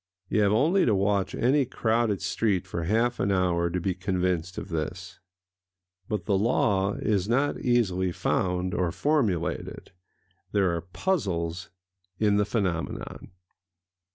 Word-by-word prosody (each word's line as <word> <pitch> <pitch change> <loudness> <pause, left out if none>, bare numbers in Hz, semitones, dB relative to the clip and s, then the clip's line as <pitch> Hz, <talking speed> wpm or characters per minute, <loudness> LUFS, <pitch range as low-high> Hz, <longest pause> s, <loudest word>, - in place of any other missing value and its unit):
You 105 - +2
have 100 -1 +3
only 160 - +3
to 110 - +3
watch 100 0 0
any 135 +4 +3
crowded 115 -4 0
street 100 -5 0
for 85 -3 -4
half 115 +6 +1
an 100 - +1
hour 90 -2 +1
to 90 - -2
be 90 +2 -1
convinced 90 -1 -1
of - - -6
this. 90 +3 -5 0.9
But 105 -5 -2
the 95 0 +2
law 100 -2 +2
is 100 -2 -1
not 135 +5 +1
easily 95 -7 +1
found 90 +1 -1
or 90 -2 0
formulated: 105 - -1 0.6
there 95 -4 +2
are 85 - -3
puzzles 90 - -2 0.5
in 105 0 +2
the 105 - +2
phenomenon. 95 -6 -3
95 Hz, 135 wpm, -27 LUFS, 90-110 Hz, 0.9 s, have